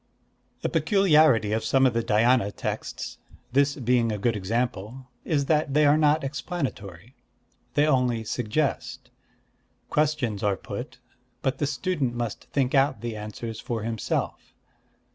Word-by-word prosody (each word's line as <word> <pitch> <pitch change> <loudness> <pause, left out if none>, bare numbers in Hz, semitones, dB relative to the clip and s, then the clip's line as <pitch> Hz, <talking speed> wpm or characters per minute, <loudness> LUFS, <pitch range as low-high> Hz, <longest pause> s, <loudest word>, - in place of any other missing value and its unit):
A - - +2
peculiarity 155 - +4
of 110 +1 0
some 135 +4 +3
of 130 - +3
the 115 - +1
Dhyâna 115 -1 +3
texts, - - -5 0.3
this 140 +1 +3
being 125 -3 +1
a 105 - -2
good 115 +2 0
example, 115 +4 -3
is 145 -3 +1
that 150 -2 +1
they 150 0 +5
are 145 +1 +6
not 155 0 +3
explanatory. 130 - -5 0.6
They 145 - +4
only 125 -6 +2
suggest. 125 +6 -2 0.8
Questions 145 -9 0
are 100 -2 +1
put; - - -7 0.5
but 135 - 0
the 145 - +1
student 140 -3 -1
must 120 -3 -4
think 135 -3 -1
out 135 -5 +3
the 120 -1 -4
answers 110 +1 -6
for 115 -2 -4
himself. 115 -1 -3
125 Hz, 140 wpm, -26 LUFS, 110-145 Hz, 0.8 s, are